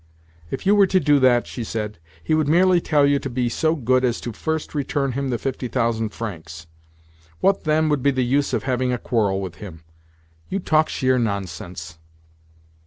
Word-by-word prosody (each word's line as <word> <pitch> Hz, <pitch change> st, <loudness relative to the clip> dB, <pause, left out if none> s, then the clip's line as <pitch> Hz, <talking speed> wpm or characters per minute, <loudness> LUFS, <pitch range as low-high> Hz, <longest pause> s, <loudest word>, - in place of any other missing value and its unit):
"If -, -, -5 dB
you 200 Hz, -, +5 dB
were 200 Hz, -2 st, +5 dB
to 185 Hz, 0 st, +3 dB
do 145 Hz, -4 st, +3 dB
that," 125 Hz, -2 st, +4 dB
she 120 Hz, -, -6 dB
said, 105 Hz, -4 st, -4 dB, 0.2 s
"he -, -, 0 dB
would 155 Hz, -2 st, +2 dB
merely 175 Hz, +3 st, +4 dB
tell 145 Hz, -3 st, +3 dB
you 140 Hz, 0 st, +3 dB
to 135 Hz, -, -5 dB
be 120 Hz, -1 st, -1 dB
so 155 Hz, +7 st, +1 dB
good 130 Hz, -2 st, +1 dB
as 120 Hz, -2 st, +1 dB
first 160 Hz, +7 st, -4 dB
to -, -, -5 dB
return 140 Hz, 0 st, -1 dB
him 135 Hz, +2 st, -3 dB
the 120 Hz, -, 0 dB
fifty 130 Hz, 0 st, -4 dB
thousand 115 Hz, -3 st, 0 dB
francs. 85 Hz, -7 st, -7 dB, 0.7 s
What, 195 Hz, -2 st, +1 dB
then, 155 Hz, +1 st, +2 dB
would 145 Hz, -3 st, +1 dB
be 140 Hz, -, +3 dB
the 130 Hz, -2 st, 0 dB
use 140 Hz, +3 st, +1 dB
of -, -, -1 dB
having 130 Hz, -1 st, 0 dB
a 125 Hz, -, 0 dB
quarrel 105 Hz, -6 st, 0 dB
with 95 Hz, -3 st, -6 dB
him? 85 Hz, -6 st, -10 dB, 0.7 s
You 195 Hz, -, -1 dB
talk 155 Hz, -4 st, +2 dB
sheer 130 Hz, -1 st, +1 dB
nonsense." 90 Hz, -6 st, -4 dB
130 Hz, 195 wpm, -22 LUFS, 110-150 Hz, 0.7 s, you